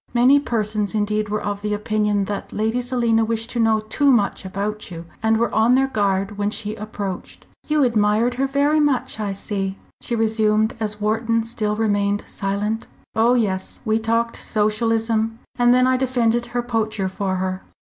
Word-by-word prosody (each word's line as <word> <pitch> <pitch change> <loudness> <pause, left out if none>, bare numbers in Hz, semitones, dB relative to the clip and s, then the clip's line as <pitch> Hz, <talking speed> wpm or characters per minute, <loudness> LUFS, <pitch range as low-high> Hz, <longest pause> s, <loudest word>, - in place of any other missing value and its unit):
Many 255 +4 +6
persons 215 -5 -1
indeed 210 0 0
were 210 0 -2
of 205 0 -3
opinion 210 -1 0
that 205 +1 -5
Lady 220 +3 0
Selina 240 -2 +1
wished 225 +1 -2
to 240 - -2
know 220 -1 +3
too 275 +6 +2
much 210 -4 +1
about 205 +3 -4
you 170 -1 -8 0.2
and 220 0 +3
were 235 +1 0
on 225 +3 +4
their 270 +1 +4
guard 200 -2 0
when 205 0 +1
she 210 0 -3
approached. 205 -3 -6 0.2
"You 300 -1 +3
admired 225 0 +2
her 265 +2 0
very 285 +3 +2
much, 285 -6 0
I 205 -2 -2
see," 195 -1 -3 0.2
she 240 - -2
resumed, 220 -1 +2
as 210 -1 -2
Wharton 225 +2 +1
still 215 -2 -2
remained 205 -2 +1
silent. 205 +3 -2 0.3
"Oh, 230 +3 +4
yes. 190 -6 -1
We 220 0 +2
talked 230 +1 0
Socialism, 225 +1 0 0.2
and 245 -1 +4
then 255 +1 +5
I 255 0 +3
defended 240 -2 +1
her 240 0 -2
poacher 220 -4 -1
for 190 0 -2
her." 185 0 -2
220 Hz, 170 wpm, -21 LUFS, 210-235 Hz, 0.3 s, Many